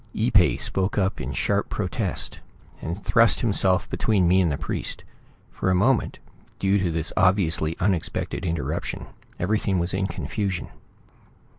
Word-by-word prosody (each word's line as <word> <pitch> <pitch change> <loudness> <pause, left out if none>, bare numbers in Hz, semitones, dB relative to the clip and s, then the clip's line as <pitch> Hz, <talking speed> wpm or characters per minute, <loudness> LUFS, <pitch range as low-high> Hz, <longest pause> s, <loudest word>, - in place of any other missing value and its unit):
Ee - - +1
pay - - +4
spoke 95 0 -1
up 95 -1 0
in 65 - -4
sharp - - 0
protest, - - -2 0.4
and 85 +5 -5
thrust 115 0 +4
himself 95 -5 +2
between 100 -5 +2
me 95 +2 +5
and 85 -4 +2
the 70 - -1
priest. - - -4 0.5
For - - -2
a 90 - +3
moment, 120 +7 +2 0.4
due 100 +1 +2
to 95 -2 0
this 80 0 -1
obviously 90 -4 +2
unexpected 90 -3 -1
interruption, 85 -3 -3 0.3
everything 100 +1 +1
was 85 +1 0
in 95 +1 0
confusion. 100 -3 -3
95 Hz, 145 wpm, -24 LUFS, 85-100 Hz, 0.5 s, me